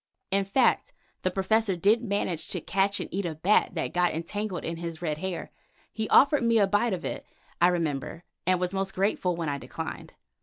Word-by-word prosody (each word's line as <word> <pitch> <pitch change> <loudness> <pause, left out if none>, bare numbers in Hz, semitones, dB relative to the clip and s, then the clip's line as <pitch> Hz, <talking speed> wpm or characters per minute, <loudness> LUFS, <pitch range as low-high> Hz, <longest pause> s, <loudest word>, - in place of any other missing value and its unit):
In 195 0 +2
fact 260 - +2 0.3
the 185 - +1
Professor 195 +2 +1
did 205 +7 +3
manage 200 -6 -1
to 180 - -1
catch 195 +4 +1
and - - -3
eat 200 +2 -1
a 160 - -4
bat 185 +3 +2
that 160 - -2
got 175 -2 +2
entangled 185 +3 -3
in 165 0 -3
his 165 -1 -5
red 155 -3 -2
hair. 190 -1 -4 0.4
He 220 -1 -3
offered 285 +1 +6
me 230 -1 +3
a 205 - +5
bite 205 +3 +1
of 175 -2 -4
it, - - -4 0.4
I 175 - +7
remember, 165 -2 -2 0.2
and 185 -1 +3
was 180 +1 -1
most 195 0 -2
grateful 190 -2 +1
when 165 -1 -3
I 140 -1 -2
declined. - - -7
190 Hz, 200 wpm, -27 LUFS, 170-205 Hz, 0.4 s, I